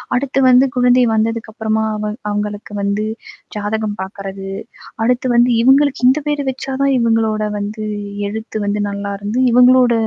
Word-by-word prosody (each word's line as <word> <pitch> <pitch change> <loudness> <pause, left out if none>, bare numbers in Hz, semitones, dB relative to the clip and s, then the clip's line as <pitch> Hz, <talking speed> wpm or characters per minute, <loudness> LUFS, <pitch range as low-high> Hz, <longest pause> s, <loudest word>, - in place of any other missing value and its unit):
அடுத்து 270 +1 0
வந்து 255 +2 +6
குழந்தை 250 0 +4
வந்ததுக்கு 220 0 -1
அப்பறமா 220 -1 -1
அவு 210 0 -3 0.2
அவுங்களுக்கு 205 0 -4
வந்து 200 +1 -1 0.5
ஜாதகம் 210 0 -2
பார்க்கிறது, 195 0 -7 0.5
அடுத்து 250 +2 +1
வந்து 240 +1 +4
இவுங்களுக்கு 270 0 +3
இந்த 265 +4 +4
பேர் 295 -1 0
வச்சா 265 +1 -5
தான் 275 -1 +2
இவுங்களோட 225 -2 +1 0.2
வந்து 215 +1 -5 0.4
எழுத்து 220 +1 -5
வந்து 205 +1 -1
நல்லாருந்து, 200 +3 -4
இவுங்களோட 250 0 +5
220 Hz, 135 wpm, -17 LUFS, 210-250 Hz, 0.5 s, வந்து